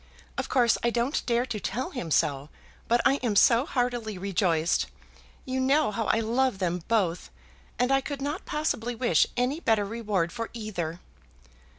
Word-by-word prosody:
Of - - -3
course 240 -3 +3
I 235 - +2
don't 240 +5 0
dare 240 0 +2
to 235 -4 -4
tell 235 +7 -3
him 180 - -5
so, 145 -1 +1 0.4
but 240 +1 +3
I 275 - +4
am 235 -6 -1
so 235 +6 +5
heartily 245 - -1
rejoiced. 180 -3 +1 0.6
You 260 0 -2
know 275 0 +3
how 220 +2 -2
I 225 - +2
love 240 +1 +1
them 180 -2 -1
both, 185 -7 0 0.5
and 250 +2 +1
I 270 0 +4
could 280 +1 -5
not 285 +3 -4
possibly 245 -6 -1
wish 225 -9 +3
any 255 +5 0
better 220 -9 +2
reward 205 -6 -1
for 230 -1 -5
either." 180 -7 -4
230 Hz, 170 wpm, -27 LUFS, 195-255 Hz, 0.6 s, so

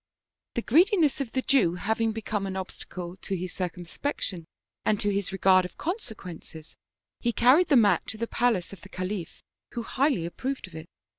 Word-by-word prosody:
" - - -64
The 235 - -1
greediness 325 - +4
of 250 -5 -4
the 260 - 0
Jew 220 -11 +3
having 220 +4 0
become 215 -2 -3
an 190 - -4
obstacle 180 -1 -6
to 195 0 -3
his 180 0 -4
circumspection 180 - -3 0.4
and 210 -1 +2
to 205 -2 +1
his 200 -1 -1
regard 190 -1 +5
of 180 - -8
consequences, 195 - -6 0.4
he 240 - +1
carried 255 +10 +5
the 285 - +4
mat 205 -8 +4
to 220 - -2
the 230 - -1
palace 230 -7 0
of 190 - -11
the 190 - -13
Khalif, 185 -2 -5 0.3
who 235 -1 -3
highly 265 - +1
approved 260 +10 -4
of 185 - -15
it. 160 +1 -8
205 Hz, 180 wpm, -27 LUFS, 180-245 Hz, 0.4 s, regard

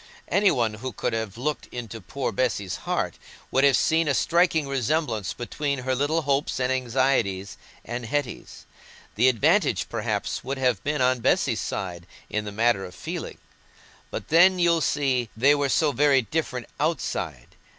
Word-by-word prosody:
Any 200 0 +4
one 115 -7 +1
who 125 +4 -6
could - - -2
have 110 -2 -3
looked 145 +2 -3
into 115 -2 -7
poor 130 +8 -3
Bessy's 105 -4 -1
heart - - -1 0.3
would 135 - +3
have 140 -3 +5
seen 160 0 +2
a 140 - +2
striking 165 -2 +2
resemblance 135 - -1
between 140 +2 -3
her 130 - +1
little 145 +5 0
hopes 140 -1 0
and 130 0 +1
anxieties 120 -7 0 0.3
and 120 -1 -5
Hetty's. 145 0 -4 0.5
The 125 +4 +4
advantage, 115 -5 +2
perhaps, - - -2
would 135 +2 -3
have 125 -6 +1
been 145 -1 -1
on 130 0 +2
Bessy's - - +1
side 85 -2 -5 0.2
in 105 0 -1
the 105 - -5
matter 110 -1 +2
of 90 -1 -9
feeling. - - -6 0.7
But - - -6
then, 185 +4 +6
you 170 -2 +3
see, 130 -6 0
they 135 +5 +5
were 145 -1 0
so 150 +2 +3
very 140 -2 +3
different 125 -1 -3
outside! 95 - -2
130 Hz, 160 wpm, -25 LUFS, 115-145 Hz, 0.7 s, then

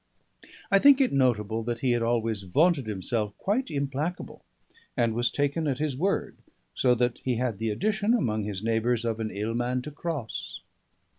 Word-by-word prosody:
I 195 - +6
think 280 +4 +7
it 270 - +2
notable 115 -5 +1
that 115 +1 -3
he 130 - +2
had 120 -1 +1
always 115 -2 0
vaunted 140 - +2
himself 105 +1 -2
quite 240 +6 -1
implacable, 140 +5 -3 0.5
and 115 -2 +2
was 120 +2 +1
taken 145 +3 -1
at 135 -3 0
his 150 -2 -1
word; 190 +8 -1 0.4
so 125 -1 +3
that 120 0 0
he 130 -2 -1
had 115 -4 -2
the 115 0 -1
addition, 210 - +1
among 110 - 0
his 100 -1 -5
neighbours 115 +1 +1
of 115 -1 -1
"an 110 -1 -2
ill 105 +3 -3
man 125 +1 -1
to 150 - -7
cross." 145 -6 -5
120 Hz, 175 wpm, -27 LUFS, 110-150 Hz, 0.5 s, think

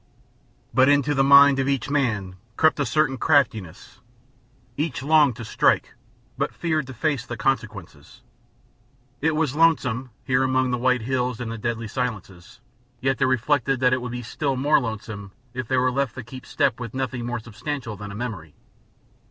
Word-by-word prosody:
But 130 +1 +5
into 145 0 +3
the 135 -1 +2
mind 140 0 +7
of 135 - 0
each 135 -2 -1
man 110 -10 -1 0.2
crept 155 -1 +3
a 145 - 0
certain 135 -4 +1
craftiness. 110 - 0 0.8
Each 145 -2 -3
longed 150 -4 +4
to 120 -1 -8
strike, - - +1 0.5
but - - -2
feared 155 -5 -1
to 130 - -8
face 140 0 -1
the 120 -1 -7
consequences. 105 - -4 1.0
It 155 +1 +1
was 155 -4 0
lonesome, 135 -6 +2
here 130 0 +1
among 130 -1 +1
the 125 - -1
white 125 -1 +1
hills 125 -1 -1
and 120 -2 -4
the 115 - -5
deathly 115 0 -3
silences, 105 -5 -5 0.4
yet 135 +1 0
they 135 - +3
reflected 130 +1 +1
that 125 0 +4
it 130 - 0
would 125 0 -5
be 125 0 -5
still 135 +4 -2
more 145 +4 +3
lonesome 110 -4 -6 0.2
if 130 -2 -4
they 130 - +1
were 125 0 +2
left 135 -1 -1
to 130 - -6
keep 130 +3 -11
step - - 0
with 120 0 -7
nothing 130 -2 -3
more 120 +1 -3
substantial 115 +2 -6
than 105 +1 -8
a - - -8
memory. 105 -10 -6
130 Hz, 175 wpm, -23 LUFS, 115-140 Hz, 1.0 s, mind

